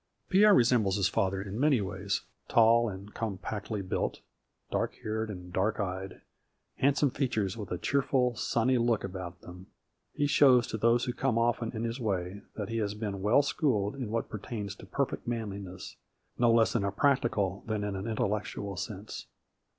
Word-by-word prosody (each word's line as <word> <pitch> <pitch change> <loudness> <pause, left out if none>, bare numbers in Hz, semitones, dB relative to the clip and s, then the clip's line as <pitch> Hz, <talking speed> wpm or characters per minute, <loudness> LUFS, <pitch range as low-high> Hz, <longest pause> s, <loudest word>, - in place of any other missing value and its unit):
Pierre 205 +2 +6
resembles 115 -6 +3
his 100 -3 +2
father 95 +1 0
in 100 +3 -5
many 140 -3 +4
ways. 95 0 -2 0.3
Tall 115 0 +5
and 100 +1 -9
compactly 105 -1 -4
built, 95 - -2 0.5
dark - - -1
haired 110 +1 -2
and 90 -3 -8
dark 100 +5 +1
eyed, 95 -1 -4 0.6
handsome 140 0 +3
features 110 -8 -1
with 105 -4 -7
a 90 - -1
cheer 140 +9 +1
ful, 125 -3 +1
sunny 120 +2 +1
look 115 -2 +1
about 90 -2 -6
them, 90 +1 -11 0.4
he 145 - 0
shows 130 -4 +5
to 110 - -4
those 115 +2 +3
who 125 - -2
come 130 -3 0
often 115 -1 +1
in 110 - -2
his 115 +2 -3
way 100 -3 -2
that 105 -3 -4
he 115 - -2
has 105 -2 -1
been 105 -3 -4
well 110 +8 +4
schooled 115 -8 0
in 130 -5 -4
what 115 +1 -1
pertains 105 -1 -5
to - - -12
perfect 140 -3 -2
manli 110 -4 -3
ness, 95 -1 -9 0.4
no 120 -1 +4
less 115 -4 +4
in 115 - +1
a 100 - 0
practical 105 -6 +1
than 110 -2 -1
in 105 -1 -2
an 95 +3 -4
intellect 105 -1 -1
ual 100 -3 -5
sense. 100 +3 -6
110 Hz, 180 wpm, -30 LUFS, 100-120 Hz, 0.6 s, Pierre